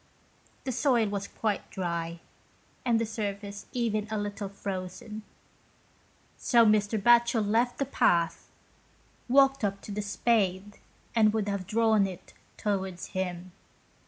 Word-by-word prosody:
The 265 Hz, -, -2 dB
soil 250 Hz, -2 st, +2 dB
was 200 Hz, 0 st, -3 dB
quite 215 Hz, -3 st, -2 dB
dry, 170 Hz, -2 st, -3 dB, 0.6 s
and 235 Hz, -3 st, +2 dB
the 230 Hz, -, 0 dB
surface 205 Hz, -2 st, -5 dB
even 220 Hz, -4 st, -1 dB
a 215 Hz, -, -2 dB
little 205 Hz, -1 st, -4 dB
frozen, 195 Hz, +2 st, -6 dB, 1.2 s
so 235 Hz, -1 st, +5 dB
Mr. 215 Hz, 0 st, +3 dB
Batchel 235 Hz, 0 st, +4 dB
left 235 Hz, +4 st, +1 dB
the 275 Hz, -, 0 dB
path, 170 Hz, -10 st, +1 dB, 0.8 s
walked 270 Hz, 0 st, +4 dB
up 200 Hz, -1 st, 0 dB
to -, -, -8 dB
the 210 Hz, +1 st, -2 dB
spade, 205 Hz, -2 st, 0 dB, 0.3 s
and 215 Hz, -2 st, +4 dB
would 215 Hz, -2 st, -1 dB
have 200 Hz, -3 st, -3 dB
drawn 220 Hz, -2 st, +3 dB
it 185 Hz, -3 st, -10 dB, 0.2 s
towards 190 Hz, -4 st, -2 dB
him. 180 Hz, -1 st, -4 dB
210 Hz, 130 wpm, -28 LUFS, 195-230 Hz, 1.2 s, so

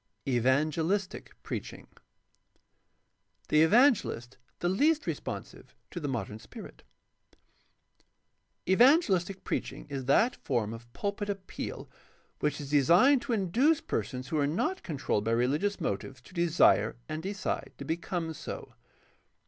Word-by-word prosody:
6. 135 Hz, -, -1 dB
EVANGELISTIC 155 Hz, -, 0 dB
PREACmNG -, -, -6 dB, 1.6 s
The 155 Hz, -, +5 dB
evangelist 190 Hz, -, +3 dB, 0.2 s
the 175 Hz, -, -1 dB
least 295 Hz, -, +2 dB
responsive -, -, -6 dB, 0.2 s
to 175 Hz, -, -5 dB
the 150 Hz, -, -3 dB
modern 115 Hz, -5 st, -4 dB
spirit. -, -, -11 dB, 0.9 s
— -, -, -44 dB
Evangelistic 195 Hz, -, +4 dB
preaching -, -, -4 dB
is 135 Hz, -2 st, -4 dB
that 220 Hz, -, +3 dB
form 115 Hz, -5 st, -1 dB
of 120 Hz, +1 st, -11 dB
pulpit 205 Hz, 0 st, -3 dB
appeal 195 Hz, -2 st, -5 dB, 0.5 s
which 150 Hz, 0 st, -1 dB
is 145 Hz, -1 st, -7 dB
designed 175 Hz, -, +5 dB
to 245 Hz, -, -2 dB
induce 235 Hz, -, +2 dB
persons 125 Hz, +4 st, -4 dB
who 155 Hz, -, 0 dB
are 140 Hz, -, +2 dB
not 370 Hz, -, -1 dB
controlled 135 Hz, -, -2 dB
by 115 Hz, +1 st, 0 dB
religious 145 Hz, +13 st, +1 dB
motives 110 Hz, +6 st, -3 dB
to 185 Hz, -, -17 dB
desire 170 Hz, -, +3 dB
and 155 Hz, 0 st, -4 dB
decide 200 Hz, +4 st, -3 dB
to -, -, -7 dB
become 165 Hz, 0 st, -3 dB
so. -, -, -8 dB
165 Hz, 125 wpm, -29 LUFS, 135-205 Hz, 1.6 s, The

